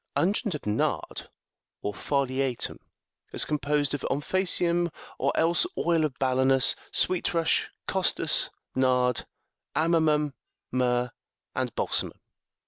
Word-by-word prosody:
Unguent 200 +1 +1
of 150 - -7
nard,66 105 +1 -1 0.6
or 105 - -2
foliatum, 135 0 -1 0.5
is - - +4
composed 145 -1 0
of 145 - -2
omphacium 175 +2 +1 0.3
or - - +2
else 170 - +3
oil 165 -2 +2
of 145 -4 -2
balanus, 130 0 +4 0.2
sweet 180 -1 +1
rush, 165 -1 +1 0.2
costus,67 - - +2 0.2
nard, 125 -2 +2 0.5
amomum,68 155 -2 +2 0.4
myrrh, 125 -1 +1 0.4
and - - -2
balsamum. - - 0
145 Hz, 105 wpm, -27 LUFS, 130-165 Hz, 0.6 s, is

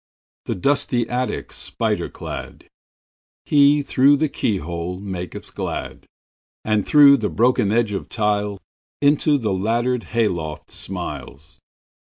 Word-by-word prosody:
The - - -2
dusty 120 +2 0
attic 125 +1 -3
spider - - -2
cladHe, 145 0 -2
through 140 +2 +4
the 155 +1 0
keyhole, 90 - -3
maketh 95 -3 -7
glad; - - -5 0.6
And 105 -2 +1
through 140 -2 +7
the 110 -4 -2
broken 115 -4 +2
edge 115 -2 +1
of 100 - -5
tiles, 105 -2 -1 0.4
Into 145 +1 +3
the 110 -7 -1
laddered 115 +5 0
hay 115 -1 +1
loft 80 -5 -5
smiles. 80 -5 -7
110 Hz, 115 wpm, -21 LUFS, 95-130 Hz, 0.6 s, through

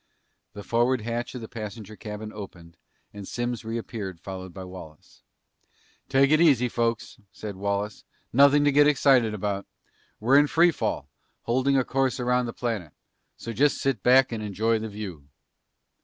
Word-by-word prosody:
The 100 - -8
forward 120 +2 +1
hatch 120 +3 -4
of 125 - -6
the 110 - -7
passenger 110 -1 -8
cabin 105 0 -7
opened 85 -5 -10 0.4
and 100 -2 -9
Simms 120 -1 -3
reappeared 110 -5 -5
followed 95 -1 -7
by 95 +2 -8
Wallace. 90 -4 -12 0.9
"Take 135 +1 +4
it 155 +1 +5
easy, 135 -7 +5
folks," 115 -1 -2
said 105 -2 -7
Wallace, 100 +1 -3 0.3
"nothing 140 +3 +6
to 145 - +4
get 145 +1 +5
excited 130 -6 +3
about. 100 -1 -3 0.5
We're 130 +6 +5
in 145 - +4
free 170 +3 +4
fall, - - -3 0.4
holding 130 +3 +2
a 130 - +2
course 135 0 0
around 125 0 +1
the - - -4
planet. 110 -11 -4 0.4
So 115 - -6
just 145 +4 +2
sit 135 -7 -1
back 125 +3 +5
and 115 -2 -4
enjoy 110 +2 0
the 110 0 -5
view!" 95 -9 -8
115 Hz, 160 wpm, -26 LUFS, 100-130 Hz, 0.9 s, nothing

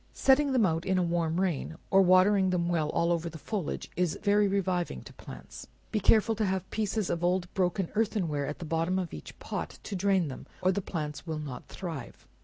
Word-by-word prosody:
Setting 275 +1 +4
them 250 -5 +4
out 165 -2 0
in 190 0 +1
a 180 - +3
warm 170 -1 0
rain, 170 -3 -1
or 195 - +7
watering 190 +1 +5
them 175 -2 +1
well 160 -3 +1
all 170 +2 +1
over 170 0 0
the 160 - -9
foliage, 195 0 -4
is 180 -3 0
very 205 0 +4
reviving 185 -3 -1
to - - -12
plants. - - -10 0.2
Be 215 - +1
careful 220 +3 +4
to 220 - +1
have 190 -2 -1
pieces 215 -2 -1
of 170 0 -2
old 180 0 0
broken 185 0 0
earthen 210 -4 +1
ware 145 -2 -2
at 150 - -4
the 170 - -7
bottom 165 +3 0
of 180 -3 -3
each 75 - -9
pot, - - -5
to 200 - -5
drain 190 -2 +2
them, 135 - -8 0.2
or 185 - +4
the 200 - -1
plants 155 -3 -5
will 160 -1 -2
not 140 -5 -7
thrive. 165 -9 -7
180 Hz, 215 wpm, -29 LUFS, 165-195 Hz, 0.2 s, or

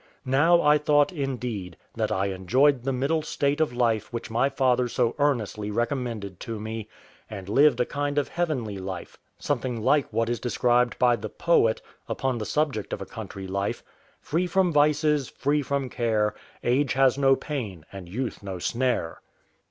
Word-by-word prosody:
Now 160 +7 +4
I 150 0 +5
thought, 145 +2 +3
indeed, 125 - -4 0.2
that - - -1
I 95 +1 +1
enjoyed 125 +9 +3
the 135 +3 -1
middle 140 +5 0
state 145 -1 0
of 155 - +2
life 115 -3 0
which 115 -1 -5
my 120 +5 +2
father 130 -2 +2
so 120 -1 0
earnestly 110 -7 0
recommended 115 -4 -3
to 115 -2 -5
me, 110 0 -5 0.4
and 95 -3 -7
lived 135 +4 +4
a 125 - +3
kind 145 +1 -3
of 145 - +1
heavenly 130 - -2
life, 95 -2 -7 0.2
something 125 -3 -2
like 135 +5 +2
what 115 +1 0
is 120 0 -1
described 125 0 +1
by 120 -1 +4
the 110 0 -6
poet, 115 -9 +2 0.3
upon 130 -3 -1
the 110 - -4
subject 145 -9 -1
of - - -4
a - - -9
country 95 -1 -8
life: 100 +1 -2 0.4
"Free 175 +4 -1
from 180 -1 +2
vices, 150 -1 +3
free 145 +2 0
from 140 -1 -2
care, 110 -4 0 0.3
Age 130 +3 +2
has 135 -1 +4
no 135 -1 +5
pain, 110 - -5
and 95 -3 -9
youth 120 +6 -4
no 95 -2 -5
snare." 120 -3 -1
125 Hz, 170 wpm, -26 LUFS, 110-145 Hz, 0.4 s, I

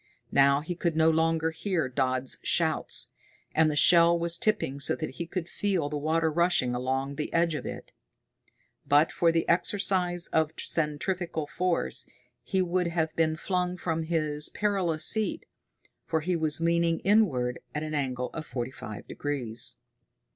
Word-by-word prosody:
Now 140 +1 +4
he 160 +4 -4
could 170 -1 -1
no 160 0 +4
longer 160 0 +1
hear 165 -2 -1
Dodd's 130 0 -1
shouts, - - +1 0.4
and 160 0 +4
the 150 - -2
shell 170 +2 +6
was 170 0 +1
tipping 210 - 0
so - - +1
that 155 - -5
he 170 - -6
could 175 -1 -4
feel 185 -6 -1
the 150 - -3
water 160 +2 +1
rushing 170 -6 +2
along 135 +3 -2
the 150 - -3
edge 170 -1 +2
of 150 - -4
it. - - -8 0.9
But 145 +3 +3
for 170 -1 +2
the 165 0 0
exercise 180 -1 +1
of 160 -1 +1
centrifugal 165 +1 -2
force 180 +3 -1 0.3
he 190 -1 0
would 180 0 0
have 160 -2 -1
been 160 -1 +1
flung 180 +1 -2
from 165 -2 -2
his 155 -2 +1
perilous 185 -7 0
seat, 220 -1 +1 0.6
for 160 -1 0
he 180 +3 -1
was 160 -1 0
leaning 170 0 +2
inward 155 - +2 0.2
at 150 - -2
an 155 0 -5
angle 130 -4 -2
of 155 -1 -6
forty 125 0 -4
five 110 -5 -9
degrees. 125 -6 -3
160 Hz, 160 wpm, -28 LUFS, 145-175 Hz, 0.9 s, shell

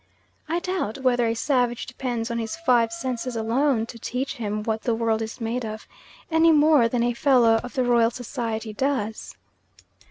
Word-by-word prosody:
I 335 - +1
doubt 350 - -2
whether 245 -2 +3
a 225 - 0
savage 245 -1 0
depends 245 -2 -4
on 235 - -2
his 225 -1 -3
five 245 -8 +2
senses 240 +1 -4
alone 230 +2 +1
to 230 0 -11
teach 255 +4 -3
him 210 -2 -3
what 220 0 -2
the 235 - 0
world 225 -1 0
is 220 +2 -5
made 235 +2 -2
of, 215 -1 -6 0.4
any 325 +1 +5
more 300 -5 +5
than 235 0 0
a 240 0 +1
Fellow 235 -3 +4
of 245 - -8
the 260 - +2
Royal 235 -2 +3
Society 230 -3 -4
does. 225 -3 -2
235 Hz, 180 wpm, -24 LUFS, 225-260 Hz, 0.4 s, any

